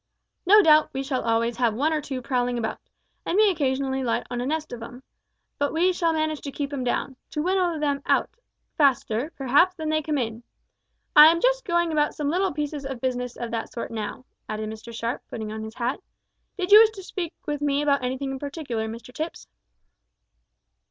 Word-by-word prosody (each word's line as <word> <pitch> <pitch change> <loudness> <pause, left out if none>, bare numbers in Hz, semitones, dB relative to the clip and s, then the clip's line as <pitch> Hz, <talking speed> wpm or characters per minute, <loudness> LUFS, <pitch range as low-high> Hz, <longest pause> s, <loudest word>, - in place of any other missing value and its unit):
No 415 +2 +8
doubt 310 -2 +6
we 270 - -2
shall 265 -2 -1
always 230 +1 0
have 235 -3 +1
one 300 +7 +1
or 305 - 0
two 265 -3 -5
prowling 245 -1 0
about, 225 -1 -3 0.4
and 360 - -1
may 425 -1 +6
occasionally 265 -4 -1
alight 240 -3 -1
on 245 0 -2
a 250 - -2
nest 310 -1 -2
of 235 - -7
'em, 245 +3 -9 0.6
but 285 0 +1
we 355 +3 +2
shall 335 -2 +1
manage 310 -1 -1
to 280 - -6
keep 285 0 -4
'em 265 -3 -2
down 250 +1 -2
to - - -4
winnow 365 -2 +1
them 285 -2 0
out - - +2 0.4
faster, 270 -2 +1
perhaps, 285 +8 +3
than 315 -3 -4
they 310 0 +1
come 300 0 -1
in. 225 -3 -3 0.7
I 300 +1 +11
am 335 +1 +4
just - - +2
going 345 -2 +1
about 300 -1 +1
some 295 -1 -1
little 375 +3 +1
pieces 295 0 -4
of 270 -2 -5
business 250 -1 -2
of 235 -1 -5
that 225 -1 -3
sort 235 - -5
now," 225 +3 -5 0.2
added 215 0 -3
Mr 220 +1 -9
Sharp; 230 +1 -3
putting 220 -2 -5
on 220 0 -5
his 220 +1 -8
hat. 245 +2 -2 0.6
"Did 370 0 -2
you 420 - +11
wish 445 -1 +7
to 385 - -9
speak 360 -3 -5
with 295 -1 -3
me 290 0 +1
about 280 -3 +2
anything 260 +2 -2
in 265 - -5
particular, 275 -6 -4
Mr 230 +2 -9
Tipps?" 315 +5 -5
280 Hz, 205 wpm, -25 LUFS, 245-315 Hz, 0.7 s, I